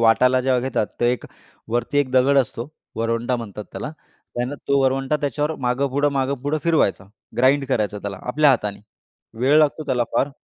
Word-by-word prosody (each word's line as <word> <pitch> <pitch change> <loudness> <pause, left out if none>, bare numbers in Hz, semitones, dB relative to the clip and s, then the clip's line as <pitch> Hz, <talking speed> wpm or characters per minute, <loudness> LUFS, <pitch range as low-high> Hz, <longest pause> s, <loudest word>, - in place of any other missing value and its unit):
वाटायला 125 +3 +4
जेव्हा 130 -1 +2
घेतात, 125 -4 -1
तर - - +2
एक 125 0 0 0.4
वरती 120 +5 0
एक 140 -3 +1
दगड 135 +2 +4
असतो, 130 -1 -1 0.3
वरवंटा 115 +2 0
म्हणतात 105 -3 -7
त्याला 150 - -5 0.4
त्यानं 125 +3 -2
तो 140 0 +4
वरवंटा 135 +2 +1
त्याच्यावर 145 +3 -1
मागेपुढं, 135 +3 +1
मागेपुढं 140 +2 -1
फिरवायचा. 155 - +2 0.3
ग्राइंड 135 +3 +4
करायचा 105 -5 0
त्याला 100 -2 -6
आपल्या 145 +4 +3
हाताने, 105 -6 -1 0.6
वेळ 140 +4 +5
लागतो 155 0 +2
त्याला 125 -3 +1
फार. 140 - +2
130 Hz, 160 wpm, -22 LUFS, 120-140 Hz, 0.6 s, वेळ